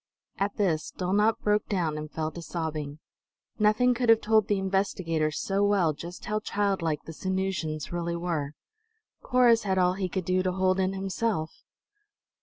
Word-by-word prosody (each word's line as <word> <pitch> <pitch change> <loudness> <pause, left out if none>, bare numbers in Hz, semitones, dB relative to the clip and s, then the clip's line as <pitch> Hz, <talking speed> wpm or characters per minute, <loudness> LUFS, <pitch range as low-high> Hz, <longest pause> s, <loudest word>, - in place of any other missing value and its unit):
At 200 +1 0
this 170 -6 0
Dulnop 205 +4 +2
broke 210 0 +1
down, 170 -6 0
and 150 0 -5
fell 155 0 -3
to 170 - -8
sobbing. 155 -4 -4 0.6
Nothing 215 +4 +4
could 240 -1 -1
have 225 -1 +7
told 220 -1 +3
the 205 - +1
investigators 185 -5 0
so 195 +1 0
well 195 -6 +3
just 170 +4 -9
how 215 0 -1
childlike 195 -7 -1
the 165 - -9
Sanusians 185 -4 -2
really 170 0 -2
were. 165 -4 -2 0.7
Corrus 245 -3 +4
had 190 -2 -1
all 180 -1 +3
he 190 -1 -2
could 185 -1 -3
do 185 +1 +2
to 185 0 -1
hold 185 0 +1
in 190 0 +1
himself. 195 -3 -2
185 Hz, 165 wpm, -27 LUFS, 165-205 Hz, 0.7 s, have